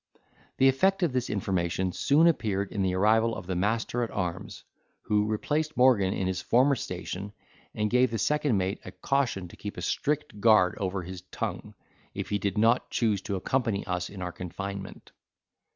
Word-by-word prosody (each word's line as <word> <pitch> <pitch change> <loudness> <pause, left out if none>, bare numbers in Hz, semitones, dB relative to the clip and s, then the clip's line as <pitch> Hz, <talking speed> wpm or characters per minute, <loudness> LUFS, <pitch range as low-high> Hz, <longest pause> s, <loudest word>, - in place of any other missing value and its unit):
The 135 - +5
effect 190 +9 +3
of 160 -7 +1
this 125 -1 -1
information 95 -2 -1
soon 145 - +3
appeared 105 - +1
in 100 - -2
the 95 -1 +1
arrival 110 +4 +3
of - - -7
the 95 0 -3
master 110 +5 0
at 115 - -1
arms, 90 -3 -4 0.4
who 105 0 +1
replaced 150 +8 -1
Morgan 120 -7 +4
in 95 - -2
his 95 0 -1
former 130 +4 +3
station, 95 -2 -5 0.4
and 105 0 0
gave 125 +3 +3
the 115 - -2
second 145 -1 +1
mate 95 +1 -1
a - - -8
caution 125 -7 -1
to - - -13
keep 105 - -7
a - - -5
strict 150 -7 -1
guard 110 -5 +5
over 95 -1 -2
his 90 0 -8
tongue, - - -5 0.4
if - - -4
he 105 - 0
did 100 0 -2
not 115 +3 +3
choose 105 -5 +1
to 100 - -3
accompany 110 +1 -1
us 90 -1 -2
in 95 -2 -7
our 90 - -3
confinement. 95 +3 -7
105 Hz, 185 wpm, -28 LUFS, 95-125 Hz, 0.4 s, The